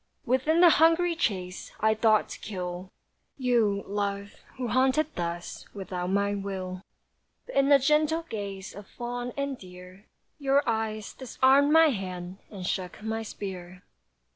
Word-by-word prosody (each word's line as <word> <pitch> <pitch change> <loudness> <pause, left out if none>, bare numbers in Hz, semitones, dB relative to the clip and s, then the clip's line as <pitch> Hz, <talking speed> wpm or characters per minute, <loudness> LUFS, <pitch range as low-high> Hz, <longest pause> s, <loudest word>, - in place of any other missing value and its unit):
Within 285 +7 +2
the 350 -2 +8
hungry 335 +1 +4
chase 185 - -2
I 220 +1 +3
thought 215 -1 +3
to - - -8
kill 180 -2 -5 0.5
You, 230 -7 +2
love, 200 0 -3 0.2
who 250 -2 -3
haunted 265 +5 +2
thus 170 0 -5
Without 180 -2 -4
my 200 +1 +1
will, 190 -2 -4 0.6
But - - -10
in 275 0 +4
the 285 - +8
gentle 305 +4 +2
gaze 200 -5 -6
Of 205 0 -10
fawn 245 +1 -5
and 280 -2 -2
deer, 180 +2 -13 0.3
Your 275 0 +2
eyes 220 -2 -2
disarmed 265 +3 +3
my 320 0 +7
hand, 185 -4 -5
And 190 -4 -7
shook 185 +3 -3
my 220 0 -2
spear. 185 -4 -7
215 Hz, 140 wpm, -28 LUFS, 190-265 Hz, 0.6 s, the